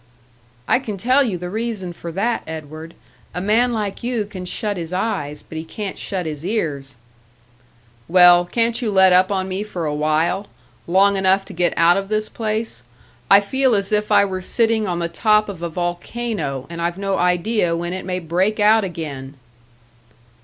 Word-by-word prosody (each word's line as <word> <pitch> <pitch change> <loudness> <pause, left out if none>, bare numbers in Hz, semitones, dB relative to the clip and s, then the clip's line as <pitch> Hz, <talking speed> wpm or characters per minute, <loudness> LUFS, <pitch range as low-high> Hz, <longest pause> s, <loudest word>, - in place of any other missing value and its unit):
"I - - +3
can 215 -6 -6
tell 255 +8 +3
you 215 -8 -2
the 180 +1 -6
reason 215 -5 -3
for 170 0 -8
that, 225 +7 -1
Edward 160 +1 -8 0.4
a - - -1
man 220 +6 +2
like 210 -4 -3
you 240 -3 -1
can 190 -3 -8
shut 205 +3 -2
his 170 -2 -6
eyes, 150 -7 -3
but 160 - -7
he - - -5
can't 195 +4 -6
shut 185 -3 -4
his 155 -1 -5
ears!" 145 - -3 1.1
"Well, 175 0 +7
can't 230 +6 0
you 230 - -1
let 190 -2 +5
up 185 +2 +4
on 190 -1 -1
me 190 +1 -3
for 185 -6 -4
awhile 155 +6 0 0.4
long 195 +3 +4
enough 190 0 +2
to - - -10
get 175 0 0
out 170 +2 +5
of 195 0 -3
this 215 0 -1
place? 220 - -3 0.5
I 200 +1 +8
feel 260 +4 +1
as 200 0 -1
if 210 0 0
I - - +6
were 185 -1 -4
sitting 225 +2 +1
on 175 -2 -2
the 170 0 -1
top 210 +5 +2
of 190 -5 -7
a 170 - -3
volcano, 175 - -3
and 170 0 -7
I've 170 +1 -1
no 195 -1 -1
idea 180 0 +1
when 175 +1 -3
it 185 - -5
may 180 0 -3
break 185 +5 0
out 215 +1 +5
again." 150 -7 -6
185 Hz, 185 wpm, -20 LUFS, 170-215 Hz, 1.1 s, I